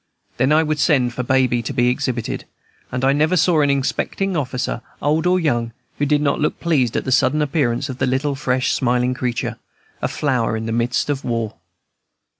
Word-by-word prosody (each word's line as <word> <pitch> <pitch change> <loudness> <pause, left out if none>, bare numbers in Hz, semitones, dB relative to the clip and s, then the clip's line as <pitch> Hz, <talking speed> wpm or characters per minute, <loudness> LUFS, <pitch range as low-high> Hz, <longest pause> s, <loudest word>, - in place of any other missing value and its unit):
Then 130 +4 +2
I 155 +1 +5
would 155 -1 -1
send 130 -5 +2
for 125 - -3
Baby 125 -1 +2
to 115 - -5
be 120 -1 +3
exhibited, 125 -2 -2 0.5
and 125 +1 -1
I 135 - +4
never 155 +5 +2
saw 160 -1 +3
an 145 - +2
inspecting 140 +7 -1
officer, 130 -4 -2 0.2
old 155 +4 +1
or 185 +1 +3
young, 120 -8 0 0.3
who 145 - +1
did 150 0 +2
not 140 -1 +1
look 150 - -1
pleased 135 -9 +1
at - - -2
the 130 - -2
sudden 135 +4 +3
appearance 140 -4 0
of 130 -2 -7
the 130 - +1
little, 135 +3 0
fresh, 130 -2 0
smiling 125 0 +1
creature, 125 -2 -3 0.4
a - - +1
flower 125 -6 0
in 110 - -4
the 115 - -3
midst 120 +5 0
of 140 -2 -3
war. 115 -3 -2
130 Hz, 200 wpm, -20 LUFS, 125-150 Hz, 0.5 s, I